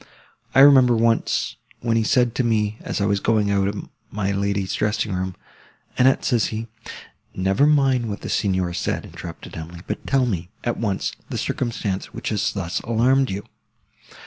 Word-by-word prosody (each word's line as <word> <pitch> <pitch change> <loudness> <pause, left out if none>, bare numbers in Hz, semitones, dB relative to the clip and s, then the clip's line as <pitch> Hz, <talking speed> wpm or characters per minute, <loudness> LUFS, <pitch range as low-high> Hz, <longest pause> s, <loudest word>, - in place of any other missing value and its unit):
I 135 - +8
remember 130 -4 +7
once, 115 0 +1 0.2
when 115 -1 +1
he 115 - +3
said 120 +1 +2
to 130 - 0
me, 110 -2 +1
as - - -3
I 100 - +1
was 100 0 +1
going 105 -1 +2
out 100 -1 +2
of 100 0 -4 0.2
my 100 -1 -2
lady's 100 -1 -1
dressing 105 -1 0
room—Annette, 95 +7 -2
says 120 -4 +2
he—" 110 +1 -4 0.7
"Never 95 +9 +2
mind 135 -6 +3
what 100 - -5
the - - -6
Signor 95 -4 0
said," - - -2
interrupted 85 -1 -9
Emily; 85 +1 -8
"but - - -5
tell 135 -2 +3
me, 90 -7 -3
at 120 - -1
once, 100 -4 -1 0.2
the - - -3
circumstance, 110 -6 -3
which - - -3
has 105 -3 0
thus 95 -3 -3
alarmed 130 +4 +2
you." 100 +2 -4
105 Hz, 170 wpm, -22 LUFS, 95-120 Hz, 0.7 s, I